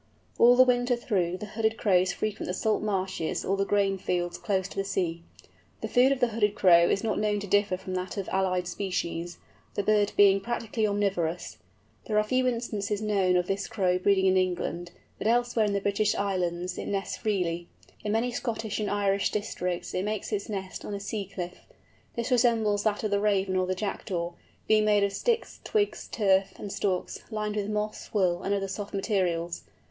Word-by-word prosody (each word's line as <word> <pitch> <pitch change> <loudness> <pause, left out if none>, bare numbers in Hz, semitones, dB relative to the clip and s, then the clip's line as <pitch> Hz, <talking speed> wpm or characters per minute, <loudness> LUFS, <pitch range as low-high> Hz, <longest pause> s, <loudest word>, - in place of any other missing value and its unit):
All 245 +1 +8
the 255 - +8
winter 245 0 +2
through 185 -7 -1
Hooded 220 +2 -1
Crows 185 -3 +3
frequent 215 +2 -3
the 180 - -2
salt 215 +2 +1
marshes 190 -5 -2
or 195 - +1
the 195 0 0
grain 195 -1 +2
fields 175 -1 -2
close 190 -3 0
to - - -11
the 195 - 0
sea. 175 -4 -2 0.6
The - - -2
food 255 +2 +4
of 275 - +1
the 245 - +3
Hooded 210 -2 +1
Crow 170 -4 +6
is 195 - +1
not 225 - 0
known 210 -1 +1
to - - -4
differ 205 -1 +2
from 185 0 -7
that 185 +2 -3
of 195 - -3
allied 185 -1 0
species, 175 -2 -3 0.4
the 205 - 0
bird 210 0 +2
being 195 -1 +6
practically 225 0 -1
omnivorous. 195 -5 -1 0.5
There 215 - 0
are 210 - +5
few 255 +4 +1
instances 215 -4 -2
known 200 -4 +2
of 180 -1 +2
this 195 +1 -2
Crow 180 -3 +1
breeding 190 0 +3
in 190 0 +4
England, 175 -1 -1 0.3
but - - -1
elsewhere 240 -1 +2
in 205 - -1
the 200 - +1
British 200 +1 +1
Islands 180 -2 -1
it - - -5
nests 195 -1 -2
freely. 175 -5 -1 0.4
In 210 - -1
many 230 +3 +1
Scottish 225 -3 -3
and 210 - -1
Irish 200 -1 +1
districts 180 -4 -3
it 185 - -1
makes 210 +1 -3
its 205 0 -2
nest 190 -3 -5
on 205 - -4
a - - -4
sea 200 -1 -4
cliff. 180 -2 -7 0.5
This 235 +2 -3
resembles 225 -4 +3
that 210 0 +1
of 215 - -1
the 200 - +2
Raven 200 -2 +1
or 185 0 +1
the 185 - 0
Jackdaw, 180 -3 -3 0.4
being 215 -1 +4
made 210 -1 +4
of 200 0 0
sticks, 470 - -1
twigs, 420 -1 -1
turf, 195 -3 +2
and 205 - -6
stalks, 185 -3 -1
lined 210 -1 -3
with 205 -1 -2
moss, 210 0 -3
wool, 180 -4 +1
and 200 - 0
other 195 -1 -2
soft 205 +1 -5
materials. 180 -4 -1
200 Hz, 195 wpm, -28 LUFS, 185-215 Hz, 0.6 s, All